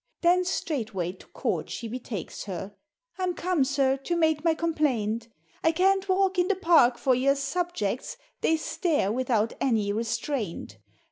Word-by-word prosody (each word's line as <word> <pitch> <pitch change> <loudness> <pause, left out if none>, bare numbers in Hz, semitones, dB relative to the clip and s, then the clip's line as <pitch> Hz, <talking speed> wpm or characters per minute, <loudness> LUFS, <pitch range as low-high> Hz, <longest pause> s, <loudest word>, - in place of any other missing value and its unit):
Then 360 +1 +4
straightway 220 - -2
to 185 - -17
Court - - -2
she 235 - -5
betakes 225 -6 -6
her, 195 +1 -6 0.2
" - - -44
I'm 365 -1 0
come, 355 -5 +1
Sir, 270 0 +2
to 310 +6 -2
make 315 -2 +2
my 330 -1 +3
complaint, 255 -10 0 0.4
I 325 - +5
can't 385 +3 +2
walk 380 0 +2
in 355 - +3
the 405 - +2
Park 325 -10 +4
for 255 +2 +2
your 270 +3 +3
subjects. 275 - -2 0.2
They 320 - +3
stare 315 - 0
without 230 -2 +1
any 215 -6 +1
restraint. 225 - -3
275 Hz, 155 wpm, -27 LUFS, 225-345 Hz, 0.4 s, I